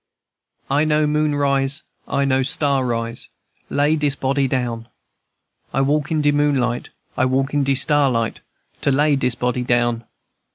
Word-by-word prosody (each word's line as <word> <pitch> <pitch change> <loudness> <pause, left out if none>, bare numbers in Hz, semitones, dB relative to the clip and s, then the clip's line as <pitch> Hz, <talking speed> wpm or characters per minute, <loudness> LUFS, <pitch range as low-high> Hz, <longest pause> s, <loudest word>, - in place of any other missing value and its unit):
"I 140 +2 +2
know 155 0 +2
moon 150 0 +1
rise, 140 +1 0 0.2
I 140 - 0
know 135 -1 +2
star 140 0 0
rise, 115 -1 -3 0.4
Lay 145 +2 +2
dis 145 -2 0
body 135 0 0
down. 120 -3 -2 0.9
I 135 - +2
walk 145 +2 +1
in 155 -2 0
de 145 - +4
moonlight, 140 -5 0 0.3
I 130 - +2
walk 135 +2 0
in 145 -1 +2
de 135 0 +1
starlight, 135 -6 +2 0.4
To - - +1
lay 145 +2 +3
dis 125 -3 +1
body 125 0 -1
down. 120 -1 0
135 Hz, 155 wpm, -20 LUFS, 125-145 Hz, 0.9 s, de